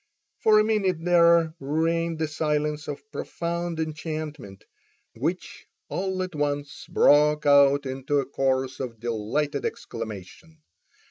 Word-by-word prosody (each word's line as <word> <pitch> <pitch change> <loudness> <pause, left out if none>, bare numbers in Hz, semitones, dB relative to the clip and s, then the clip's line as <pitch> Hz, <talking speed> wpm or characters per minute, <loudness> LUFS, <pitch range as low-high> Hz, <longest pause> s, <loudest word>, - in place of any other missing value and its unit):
For 215 -1 +5
a 215 - +5
minute 210 -5 +1
there 170 -2 +5
reigned 165 +3 0
the 160 0 -1
silence 150 0 -1
of 145 - -6
profound 170 0 -4
enchantment, 155 - -5 0.5
which 160 +10 -4 0.2
all 190 0 -2
at 185 -1 -6
once 145 -1 -3
broke 150 +1 +4
out 140 0 +5
into 135 +2 -2
a 135 - -1
chorus 130 -1 -1
of 120 -4 -5
delighted 120 +6 -2
exclamation. 115 - -7
150 Hz, 120 wpm, -25 LUFS, 135-165 Hz, 0.5 s, For